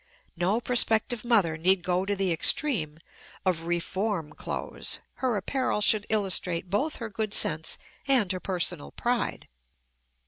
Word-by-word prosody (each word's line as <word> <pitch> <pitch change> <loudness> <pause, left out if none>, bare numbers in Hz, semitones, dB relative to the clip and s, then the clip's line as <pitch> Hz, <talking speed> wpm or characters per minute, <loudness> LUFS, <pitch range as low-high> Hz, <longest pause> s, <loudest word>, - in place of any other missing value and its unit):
No 185 +6 0
prospective 235 -1 +2
mother 205 -10 +2
need 185 +2 +3
go 180 +1 0
to 205 - 0
the 195 -2 0
extreme 165 - +2 0.5
of 170 -3 -1
"Reform 175 -1 -2
Clothes"; - - -3 0.2
her 250 -4 0
apparel 255 +4 -1
should 210 0 +3
illustrate 185 -4 0
both 285 +10 0
her 230 - -5
good 215 0 -2
sense 155 0 +3 0.3
and 250 -9 +3
her 185 - -3
personal 175 - -1
pride. - - -2
195 Hz, 135 wpm, -27 LUFS, 175-225 Hz, 0.5 s, need